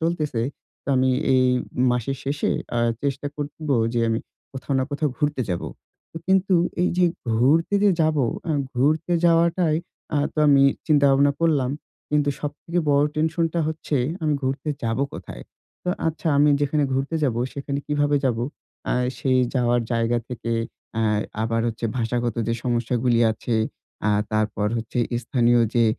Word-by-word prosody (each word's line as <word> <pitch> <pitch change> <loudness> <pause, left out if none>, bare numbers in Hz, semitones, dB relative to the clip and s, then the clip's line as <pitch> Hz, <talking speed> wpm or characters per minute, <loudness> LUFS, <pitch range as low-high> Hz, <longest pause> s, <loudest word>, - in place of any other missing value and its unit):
চলতেছে 155 -8 -1 0.4
তো - - -11
আমি 130 0 +3 0.2
এই 130 0 +4 0.5
মাসের 125 +2 -1
শেষে 140 +2 -1 0.3
আ - - +2 0.2
চেষ্টা 140 0 -2
করব 150 +1 -6 0.2
যে 120 - +1
আমি 115 0 +1 0.3
কোথাও 135 +1 -4
না 130 - +1
কোথাও 145 +1 0
ঘুরতে 150 -3 0
যাবো। 85 - -2 0.6
কিন্তু 190 0 +3 0.3
এই 180 - +3
যে 180 - +5 0.3
ঘুরতে 145 - +3
যে 205 - +5
যাবো 155 -4 +2 0.2
অ্যা 165 - -1 0.2
ঘুরতে 155 +7 +1
যাওয়াটাই 170 -1 +3 0.4
আ - - +2 0.2
তো - - -8
আমি 140 -1 +6 0.2
চিন্তা 145 -3 +4
ভাবনা 140 +1 +4
করলাম। 145 -6 +2 0.4
কিন্তু 145 -1 +2
সবথেকে 150 +4 -3
বড় 140 +1 +4
টেনশনটা 160 +2 0
হচ্ছে 155 -2 -2 0.3
আমি 150 -2 +2
ঘুরতে 135 +3 -2
যাবো 115 +3 0
কোথায়? - - -8 0.4
তো - - -3 0.2
আচ্ছা 160 +1 -6
আমি 145 +1 +5
যেখানে 145 0 +1
ঘুরতে 135 +5 -1
যাবো 120 -3 0
সেখানে 140 0 -3
কীভাবে 145 0 +1
যাবো? 120 -2 +1 0.5
আ - - +2 0.3
সেই 130 -1 +2 0.2
যাওয়ার 120 -1 +2
জায়গা 115 +1 +1
থেকে 115 -1 -4 0.4
অ্যা 115 - +1 0.4
আবার 115 0 0
হচ্ছে 115 0 -4
ভাষাগত 120 0 -1
যে 115 - +1
সমস্যাগুলি 120 0 +1
আছে 115 +2 -3 0.5
আ - - +4 0.2
তারপর 110 -1 0
হচ্ছে 115 +1 -4 0.2
স্থানীয় 120 0 +3
যে 120 -1 +4
140 Hz, 150 wpm, -23 LUFS, 120-155 Hz, 0.6 s, আমি